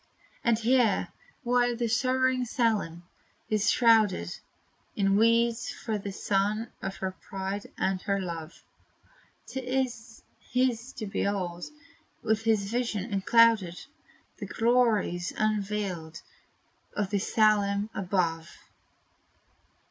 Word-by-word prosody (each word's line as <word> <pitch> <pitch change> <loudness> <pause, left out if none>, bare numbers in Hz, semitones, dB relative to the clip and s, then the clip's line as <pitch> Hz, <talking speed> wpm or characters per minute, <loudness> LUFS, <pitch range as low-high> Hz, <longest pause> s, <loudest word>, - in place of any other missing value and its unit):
And 235 -2 +3
here, 230 -2 +2 0.3
while 245 0 +2
the 235 0 -1
sorrowing 255 +2 +1
Salem 220 -9 0 0.5
is 210 -1 +2
shrouded 215 - +3 0.6
In 195 -1 +2
weeds, 230 +2 +3
for 220 -2 -4
the 200 0 -5
son 205 +3 -1
of 195 - -4
her 190 0 -3
pride 195 +2 -6
and 190 -1 0
her 200 0 0
love, 170 -3 -6 0.8
'T 265 - -5
is 245 -3 -3 0.2
his 250 0 -1
to 220 - -6
behold, 185 -3 -2 0.6
with 220 +1 0
a 225 - +6
vision 215 0 -2
unclouded, 200 -2 +4 0.6
The 205 - -6
glories 225 -7 +1
unveiled 200 -6 -2 0.7
of 205 -2 -1
the 200 - +1
SALEM 210 0 +2
above. 175 -4 -1
210 Hz, 105 wpm, -28 LUFS, 195-235 Hz, 0.8 s, a